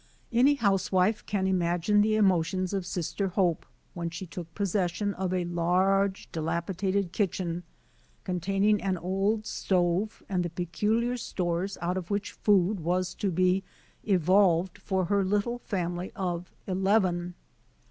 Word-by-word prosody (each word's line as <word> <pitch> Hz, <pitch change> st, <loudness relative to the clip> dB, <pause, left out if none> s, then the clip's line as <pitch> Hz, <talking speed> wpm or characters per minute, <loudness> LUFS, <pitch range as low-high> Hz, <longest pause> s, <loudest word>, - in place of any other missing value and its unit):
Any 265 Hz, +5 st, +5 dB
housewife 195 Hz, -2 st, +2 dB
can 200 Hz, -2 st, 0 dB
imagine 180 Hz, +2 st, +2 dB
the 215 Hz, +1 st, +2 dB
emotions 185 Hz, -2 st, +2 dB
of 190 Hz, -3 st, -2 dB
Sister 185 Hz, +3 st, -2 dB
Hope, 180 Hz, -3 st, 0 dB, 0.3 s
when 170 Hz, -1 st, -3 dB
she 170 Hz, +3 st, -6 dB
took 170 Hz, -1 st, -8 dB
possession 200 Hz, 0 st, 0 dB
of 185 Hz, -1 st, -2 dB
a 180 Hz, -1 st, 0 dB
large, 190 Hz, +3 st, +1 dB
dilapidated 180 Hz, +4 st, -1 dB
kitchen, 180 Hz, -3 st, -1 dB, 0.6 s
containing 195 Hz, +3 st, +1 dB
an 190 Hz, -2 st, 0 dB
old 195 Hz, +5 st, 0 dB
stove 185 Hz, +3 st, 0 dB
and 185 Hz, -2 st, 0 dB
the 175 Hz, -, -2 dB
peculiar 210 Hz, +8 st, 0 dB
stores 180 Hz, -3 st, -2 dB
out 180 Hz, +2 st, 0 dB
of 180 Hz, -2 st, -5 dB
which 200 Hz, 0 st, -2 dB
food 200 Hz, -1 st, +2 dB
was 180 Hz, +2 st, -1 dB
to 200 Hz, -, -2 dB
be 185 Hz, +2 st, +2 dB, 0.4 s
evolved 185 Hz, -1 st, +3 dB
for 190 Hz, -2 st, -1 dB
her 200 Hz, +2 st, +2 dB
little 210 Hz, +5 st, 0 dB
family 180 Hz, -4 st, -3 dB
of 175 Hz, -2 st, -3 dB
eleven. 185 Hz, -2 st, +1 dB
185 Hz, 135 wpm, -28 LUFS, 175-200 Hz, 0.6 s, Any